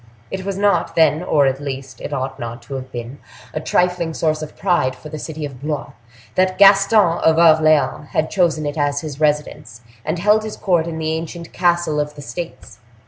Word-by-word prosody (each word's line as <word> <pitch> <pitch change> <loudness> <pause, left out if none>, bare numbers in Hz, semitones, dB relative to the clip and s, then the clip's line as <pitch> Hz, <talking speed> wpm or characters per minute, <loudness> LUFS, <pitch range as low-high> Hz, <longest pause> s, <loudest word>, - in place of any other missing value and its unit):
It 190 0 -4
was 195 -1 -3
not 200 -4 +1
then, 160 -1 +4
or, 150 -5 +2
at 135 0 0
least, 135 -2 -6
it - - -6
ought 130 +1 -3
not 120 +1 -6
to 140 - -9
have 130 -1 -6
been, 120 +3 -7 0.3
a - - -2
trifling 175 0 0
source 155 -1 0
of 155 - -8
pride 175 -9 +1
for 155 - -11
the 155 0 -6
city 155 0 -5
of 135 -3 -9
Blois, 150 -1 -3 0.4
that 185 0 +1
Gaston 195 -2 +5
of 160 0 +3
Orleans 155 -4 +4
had 155 - -1
chosen 165 -5 +1
it 145 +1 -3
as 145 0 0
his 150 -3 -7
residence, 150 -6 -1 0.2
and - - -2
held 210 +4 +3
his 215 -1 -6
court 175 -4 +1
in 165 -1 -4
the 160 0 -1
ancient 165 +1 -6
Castle 175 -4 +1
of 150 0 -3
the 145 - -9
States. 130 - -8
155 Hz, 200 wpm, -19 LUFS, 145-175 Hz, 0.4 s, Gaston